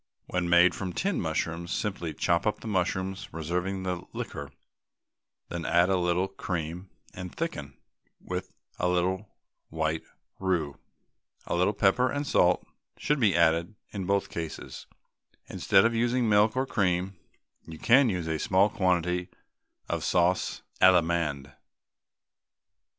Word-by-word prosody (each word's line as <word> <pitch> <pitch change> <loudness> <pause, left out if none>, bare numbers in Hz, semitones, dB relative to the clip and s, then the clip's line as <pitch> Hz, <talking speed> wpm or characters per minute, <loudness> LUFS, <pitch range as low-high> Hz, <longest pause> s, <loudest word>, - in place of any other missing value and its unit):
When 90 -1 -2
made 85 +1 +6
from 95 -2 -4
tinned 195 0 -1
mushrooms, 80 +2 -2
simply 95 -6 -2
chop 85 +6 +1
up 105 -1 -1
the - - -7
mushrooms, 95 0 -1
reserving 90 +4 -3
the 90 -2 -2
liquor, 70 -1 -6 1.0
then 85 -1 -4
add 85 +3 +3
a - - +4
little 90 +1 +1
cream 90 -1 -5 0.2
and 90 -1 -8
thicken 75 - -4 0.4
with - - -5 0.3
a 90 - +1
little 95 +3 0 0.4
white 80 0 -1 0.4
roux. 85 -7 -1 0.7
A - - -3
little 90 +4 +2
pepper 105 +7 +3
and 145 +3 -2
salt 90 -8 +3 0.3
should 150 0 0
be 105 -8 +3
added 85 +4 +2 0.2
in 95 -3 -4
both 100 0 +1
cases. 80 -2 -6 0.6
Instead 95 - +3
of 115 - +2
using 120 +2 +1
either 115 - +1
milk 105 +2 +4
or 130 - +2
cream, 95 -4 0 0.5
you 80 - -8
can 130 - +5
use 90 -5 -2
a 80 -1 -1
small 95 +5 +3
quantity 90 -3 0 0.6
of - - -2
sauce 90 +1 +1 0.2
Allemande. 85 -6 +3
90 Hz, 135 wpm, -28 LUFS, 85-100 Hz, 1.0 s, made